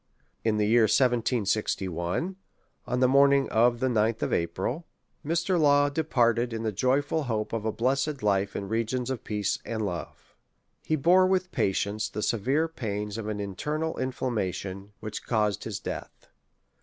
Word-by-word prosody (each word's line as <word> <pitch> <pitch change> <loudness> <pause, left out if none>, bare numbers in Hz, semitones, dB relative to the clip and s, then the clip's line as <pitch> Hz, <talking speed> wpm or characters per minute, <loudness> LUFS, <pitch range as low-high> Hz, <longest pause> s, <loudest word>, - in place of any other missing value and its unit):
In 110 -1 +1
the 105 - +2
year 115 +1 +5
1761, 110 - 0 0.5
on 125 - 0
the 130 - +6
morning 140 +1 +5
of 120 +1 +3
the 130 - +1
9th 115 -2 +1
of - - -1
April, 120 - -2 0.4
Mr. 170 +3 +1
Law 145 -1 +4
departed 120 -6 +1
in 115 0 -3
the 110 - 0
joyful 140 +8 +1
hope 110 -3 -2
of 110 -1 -2
a 110 - +1
bless 130 +6 +1
ed 145 -5 -5
life 100 -1 +1
in 100 - -3
regions 115 +4 -1
of 130 - -4
peace 105 -2 -1
and 110 -2 -3
love. 90 -4 -6 0.5
He 155 - 0
bore 180 +5 +5
with 185 -1 0
patience 100 +2 0
the 105 - -4
severe 135 +8 +1
pains 105 -7 -4
of 110 - -5
an 105 -1 -3
internal 150 - -3
inflammation, 100 -6 -3
which 105 -1 -6
caused 105 -4 0
his - - -4
death. - - -7
115 Hz, 160 wpm, -27 LUFS, 105-140 Hz, 0.5 s, the